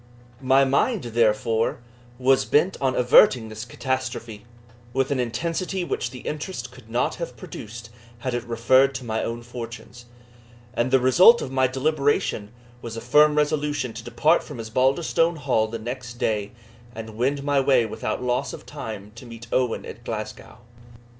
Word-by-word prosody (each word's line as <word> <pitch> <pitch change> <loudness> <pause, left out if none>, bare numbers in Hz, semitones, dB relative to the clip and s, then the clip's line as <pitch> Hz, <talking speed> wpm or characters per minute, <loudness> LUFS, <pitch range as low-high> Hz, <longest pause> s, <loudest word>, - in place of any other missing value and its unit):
My 135 +1 +4
mind, 180 - +1
therefore, 115 -1 +1 0.4
was 130 +1 +3
bent 175 +6 +2
on 130 -2 +1
averting 125 -2 +5
this 110 0 -7
catastrophe, 120 -4 -4 0.5
with 135 +1 0
an 140 - 0
intensity 170 +9 -2
which 125 - -2
the 125 -1 -10
interest 155 0 -5
could 125 -3 -16
not 120 +2 0
have 145 -8 -6
produced 115 +1 -9 0.3
had 125 +1 -4
it 120 -1 -2
referred 130 +4 +3
to 130 - -5
my 110 -1 -1
own 115 0 -4
fortunes; 120 0 -9 0.7
and 120 0 0
the 130 - +4
result 180 - +7
of 130 - -5
my 130 -1 +3
deliberation 140 -5 0 0.3
was 115 -1 -7
a - - -2
firm 150 +5 +4
resolution 150 -4 0
to 115 +1 -8
depart 160 +7 +2
from 145 -6 -9
Osbaldistone 135 +9 +1
Hall 130 -7 +1
the 115 +1 -5
next 120 +1 -6
day 105 -3 -1 0.4
and 110 -1 -8
wend 135 +5 0
my 145 -1 +2
way 130 -3 +3
without 110 +2 -4
loss 125 0 -1
of - - -10
time 105 -2 -7
to 115 +2 -12
meet 115 0 -10
Owen 125 -3 0
at - - -10
Glasgow. - - -6
125 Hz, 160 wpm, -24 LUFS, 115-140 Hz, 0.7 s, result